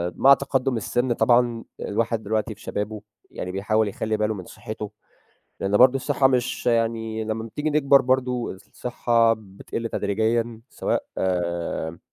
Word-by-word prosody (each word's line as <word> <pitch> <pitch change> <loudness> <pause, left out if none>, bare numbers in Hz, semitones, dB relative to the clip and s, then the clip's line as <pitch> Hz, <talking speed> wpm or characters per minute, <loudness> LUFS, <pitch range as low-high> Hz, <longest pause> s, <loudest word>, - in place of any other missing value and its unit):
مع 140 +1 +7
تقدُّم 135 -2 0
السِّن 120 +3 0
طبعًا 120 -1 +3 0.2
الواحد 115 +1 -1
دلوقتي 110 +1 -1
في - - -20
شبابه 105 +1 -4 0.3
يعني 90 - -5
بيحاول 105 +3 +1
يخلّي 110 +2 -2
باله 105 0 0
من 95 -4 -7
صحّته 105 -1 -7 0.7
لأن 100 +1 +1
برضه 130 +3 +7
الصحّة 140 0 +2
مش 125 -2 0
يعني، 115 -1 0
لمّا 110 +1 -3
بتيجي 150 +7 -3
نكبَر 140 -2 +5
برضه 125 -1 0
الصحّة 115 +3 +1
بتقِل 110 +3 -6
تدريجيا 110 +3 0
سواء - - -1
آآ، 85 -2 -2
115 Hz, 140 wpm, -24 LUFS, 105-125 Hz, 0.7 s, مع